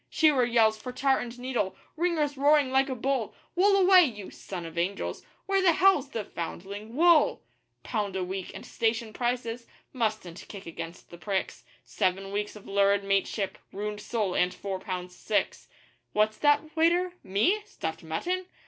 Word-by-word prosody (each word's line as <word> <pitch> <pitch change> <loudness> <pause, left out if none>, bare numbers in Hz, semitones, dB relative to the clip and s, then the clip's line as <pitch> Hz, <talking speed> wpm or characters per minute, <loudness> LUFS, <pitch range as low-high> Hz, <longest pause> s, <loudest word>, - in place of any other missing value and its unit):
Shearer 295 -6 +4
yells 225 -2 +3
for 250 +4 -7
tar 265 +1 +2
and 240 0 -6
needle. 245 -6 -2 0.2
Ringer's 315 -4 0
roaring 285 -1 +4
like 270 +1 +3
a 260 - -2
bull: 255 -2 -1 0.2
'Wool 395 +2 +5
away, 370 -1 +8
you 210 - -4
(son 180 -3 -7
of 165 0 -9
angels). 180 +4 -2 0.2
Where 390 0 +2
the 360 -3 +5
hell's 385 -5 +4
the 225 -5 -3
(foundling) 200 +6 -7
WOOL!!' 335 +1 +4 0.4
Pound 205 -4 -2
a 190 - -1
week 185 0 -4
and - - -8
station 225 -1 -1
prices 240 -1 -2 0.3
mustn't 215 -8 -2
kick 200 -2 -9
against 165 +1 -8
the 170 - -11
pricks 195 0 -3 0.2
Seven 195 +1 -1
weeks 205 +1 -3
of 210 - -12
lurid 200 0 +3
mateship 195 0 -1
ruined 210 +1 -4
soul 210 -4 -1
and 180 0 +2
four 195 -2 -4
pounds 180 -2 -5
six. 215 - -1 0.5
What's 215 +1 +2
that? 295 +2 +2
waiter? 345 +2 +3
me? 315 - +2
stuffed 160 - -5
mutton! 355 - -2
220 Hz, 165 wpm, -28 LUFS, 195-285 Hz, 0.5 s, away